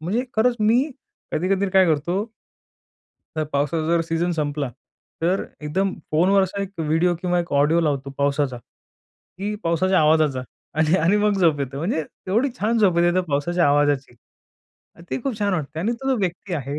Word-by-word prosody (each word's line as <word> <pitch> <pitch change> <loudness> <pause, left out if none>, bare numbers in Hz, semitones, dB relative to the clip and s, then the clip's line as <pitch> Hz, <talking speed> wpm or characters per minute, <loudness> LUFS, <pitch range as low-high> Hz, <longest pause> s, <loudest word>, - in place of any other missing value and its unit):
म्हणजे 205 +10 -1
खरंच 240 +2 +3
मी 225 +4 +4 0.5
कधी-कधी 190 +4 +1
काय 190 0 +5
करतो. 170 +5 0 1.1
तर 155 - 0
पावसाचा 150 +3 0
जर 170 +1 +2
सीझन 165 +1 -1
संपला 145 -3 -2 0.5
तर 180 +4 +1 0.2
एकदम 185 +6 -1 0.2
फोनवरचा 190 +4 +2
एक 195 - -4
व्हिडिओ 165 +3 +2
किंवा 180 -1 0
एक 170 - -6
ऑडिओ 145 +4 +3
लावतो 140 -4 -1
पावसाचा, 140 -2 0
की 200 - -10
पावसाच्या 180 +3 +2
आवाजाचा 150 -4 +3 0.4
आणि 160 +3 +3
आणि 175 +5 +3
मग 210 -1 +2
झोप 160 -5 +3
येते. 135 0 -4
म्हणजे 160 +1 -1 0.2
एवढी 230 +9 +2
छान 225 +3 +1
झोप 190 -6 +3
येते 175 0 +3
तर - - +4
पावसाच्या 170 +5 +1
आवाजाची. 145 -3 +1 1.0
ते - - -2
खूप 255 -5 -3
छान 205 -1 0
वाटते 155 -2 -4
आणि 220 +7 0
तो 265 +3 -5
जो 260 - +2
व्यक्ती 185 -1 -3
आहे 140 -1 -4
170 Hz, 165 wpm, -22 LUFS, 150-195 Hz, 1.1 s, काय